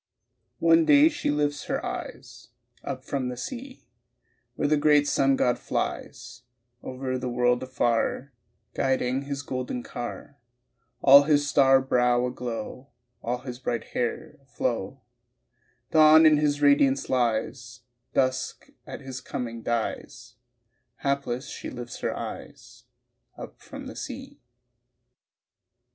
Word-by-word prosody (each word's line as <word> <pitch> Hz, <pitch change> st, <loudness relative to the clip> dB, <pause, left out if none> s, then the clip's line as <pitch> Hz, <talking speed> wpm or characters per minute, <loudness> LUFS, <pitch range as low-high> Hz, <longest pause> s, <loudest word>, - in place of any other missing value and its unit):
One 165 Hz, 0 st, +5 dB
day 290 Hz, -, +6 dB
she 305 Hz, -, -3 dB
lifts 145 Hz, 0 st, -1 dB
her -, -, -2 dB
eyes 120 Hz, -2 st, -7 dB, 0.4 s
Up 130 Hz, -1 st, -6 dB
from 130 Hz, -3 st, -2 dB
the 125 Hz, -, -6 dB
sea 255 Hz, -, -8 dB, 0.7 s
Where 145 Hz, -, 0 dB
the 150 Hz, -, +3 dB
great 145 Hz, -1 st, +4 dB
sun 135 Hz, -1 st, +3 dB
god 125 Hz, -2 st, +1 dB
flies -, -, -4 dB, 0.4 s
Over 130 Hz, 0 st, -4 dB
the 125 Hz, -, -3 dB
world 125 Hz, 0 st, +1 dB
afar, 130 Hz, +1 st, -1 dB, 0.4 s
Guiding 130 Hz, 0 st, 0 dB
his 140 Hz, -1 st, -4 dB
golden 125 Hz, -1 st, -4 dB
car 120 Hz, +3 st, -7 dB, 0.6 s
All 140 Hz, +1 st, +9 dB
his 145 Hz, -1 st, +2 dB
star 135 Hz, -2 st, +5 dB
brow 125 Hz, -1 st, +2 dB
aglow, 125 Hz, +1 st, -6 dB, 0.3 s
All 120 Hz, +1 st, -2 dB
his 125 Hz, -1 st, -7 dB
bright 120 Hz, -3 st, -3 dB
hair 120 Hz, -2 st, -3 dB
aflow; 125 Hz, -1 st, -3 dB, 0.9 s
Dawn 155 Hz, 0 st, +7 dB
in 155 Hz, -1 st, +6 dB
his 145 Hz, -1 st, 0 dB
radiance 140 Hz, -1 st, +4 dB
lies, 120 Hz, 0 st, -1 dB, 0.3 s
Dusk 130 Hz, -1 st, -1 dB, 0.2 s
at -, -, -8 dB
his 130 Hz, -1 st, -7 dB
coming 115 Hz, -2 st, -5 dB
dies 115 Hz, -1 st, -4 dB, 0.7 s
Hapless 140 Hz, -1 st, -1 dB
she -, -, -7 dB
lifts 120 Hz, -1 st, -8 dB
her -, -, -2 dB
eyes -, -, -9 dB, 0.5 s
Up -, -, -10 dB
from -, -, -10 dB
the -, -, -8 dB
sea. -, -, -8 dB
130 Hz, 125 wpm, -26 LUFS, 125-145 Hz, 0.9 s, All